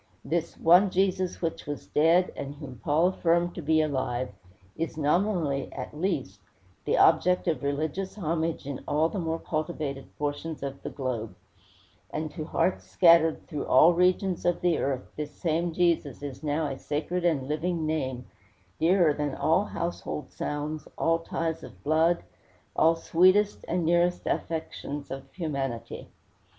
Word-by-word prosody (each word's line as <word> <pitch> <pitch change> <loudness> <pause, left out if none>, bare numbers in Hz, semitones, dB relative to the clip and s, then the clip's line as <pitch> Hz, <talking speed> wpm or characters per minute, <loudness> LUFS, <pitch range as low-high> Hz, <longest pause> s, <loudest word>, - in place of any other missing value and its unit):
This 170 0 -2
"one 180 +4 +6
Jesus 185 -1 0
which 165 -3 -3
was 145 -1 -5
dead, 165 +4 +3
and 140 0 -6
whom 140 -5 -10
Paul 160 +5 +3
affirmed 175 -1 +1
to - - -6
be 155 +1 +3
alive," 130 -4 -1 0.5
is 165 -1 -3
nominally, 155 -2 +1
at 130 +2 -7
least, 150 - -2 0.5
the - - +2
object 180 0 +4
of 165 - 0
religious 155 +7 -2
homage 165 -5 -2
in 140 -2 -5
all 155 +2 +2
the 195 - -4
more 165 -1 -1
cultivated 155 -4 -3
portions 145 +1 -3
of 140 0 -5
the - - -5
globe; 125 -6 -4 0.7
and 155 0 -4
to 155 -1 -5
hearts 180 +3 0
scattered 165 -2 +5
through 150 -2 -5
all 155 +7 +7
regions 180 +1 +2
of 175 0 +1
the 175 -3 +2
earth 135 -2 -1
this 150 -1 -5
same 170 +1 0
Jesus 165 -6 0
is 140 -3 -6
now 155 +1 0
a 135 -2 -4
sacred 160 +4 -2
and 150 -7 +1
living 160 +2 -1
name, 130 -5 -2 0.5
dearer 170 -2 +4
than 145 -2 -2
all 160 +7 +2
household 170 -5 -4
sounds, 150 +1 -4
all 165 0 +2
ties 165 -1 -3
of - - -13
blood, 160 +3 +2 0.5
all 165 +1 +4
sweetest 185 +5 +3
and 175 -1 0
nearest 175 +1 +2
affections 150 -3 -3
of 135 0 -7
humanity. 140 -9 -4
160 Hz, 150 wpm, -27 LUFS, 145-175 Hz, 0.7 s, all